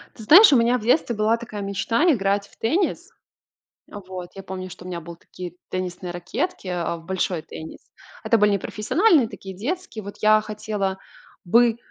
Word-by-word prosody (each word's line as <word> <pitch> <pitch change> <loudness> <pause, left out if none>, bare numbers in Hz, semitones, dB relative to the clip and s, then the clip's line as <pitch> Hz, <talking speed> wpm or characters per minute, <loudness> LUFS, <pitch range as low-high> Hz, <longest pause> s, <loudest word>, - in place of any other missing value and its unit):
Ты 225 - -10
знаешь, 360 - +9
у 270 - +6
меня 235 +2 +3
в - - -8
детстве 240 +1 +2
была 215 +2 +2
такая 225 -3 -7
мечта- 200 +7 0
играть 200 -4 0
в - - -25
теннис. 335 - -1 0.8
Вот. 185 -3 -8
Я 195 - -8
помню, 185 -1 -7
что 180 - -11
у - - -8
меня 175 -2 -4
был 170 +1 -10
такие 175 0 -9 0.2
теннисные 180 -1 -4
ракетки, 215 - -4
э, 175 -1 -2
в 165 - -14
большой 180 -2 -2
теннис. 160 +1 -10 0.4
Это 230 - +3
были 210 0 +4
непрофессиональные, 250 - +2
такие 190 -2 -9
детские. 245 - -5
Вот 200 - -8
я 215 0 +6
хотела 210 -2 -3 0.5
бы, 230 +5 +4
205 Hz, 175 wpm, -23 LUFS, 185-230 Hz, 0.8 s, знаешь